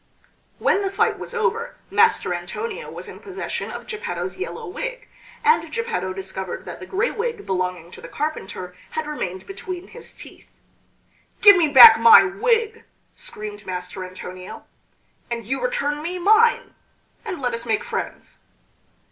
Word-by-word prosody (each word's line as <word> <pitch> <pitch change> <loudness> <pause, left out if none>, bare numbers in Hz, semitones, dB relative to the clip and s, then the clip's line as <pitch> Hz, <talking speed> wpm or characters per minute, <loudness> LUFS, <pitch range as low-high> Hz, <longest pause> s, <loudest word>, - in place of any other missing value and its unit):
When 400 - +2
the 390 - -1
fight 430 +3 +1
was - - -8
over 465 +2 -1 0.2
Master 455 - +3
Antonio 425 - -5
was - - -9
in - - -10
possession 390 -3 -5
of - - -7
Geppetto's 440 -3 -4
yellow 420 +4 -6
wig, - - -6 0.4
and 460 +1 +3
Geppetto 460 - -2
discovered 190 -1 -6
that - - -8
the - - -9
gray 415 +5 0
wig 460 -1 -4
belonging 180 -2 -3
to - - -12
the - - -9
carpenter 190 -11 -5
had 315 - -3
remained 190 -12 -5
between 370 -2 -7
his - - -10
teeth. - - -13 0.9
"Give 410 -1 +10
me 340 -3 +3
back 295 - +10
my 460 -1 +9
wig," 450 +3 0 0.3
screamed 210 -1 -7
Master 180 +1 -5
Antonio. 185 0 -9 0.6
"And 235 -2 -4
you 265 +5 -2
return 300 -13 -1
me 350 +4 -4
mine, 435 +6 +3 0.5
and 390 -8 -5
let 250 -3 -1
us 230 +1 -5
make 220 -2 0
friends." - - -6
370 Hz, 150 wpm, -22 LUFS, -, 0.9 s, Give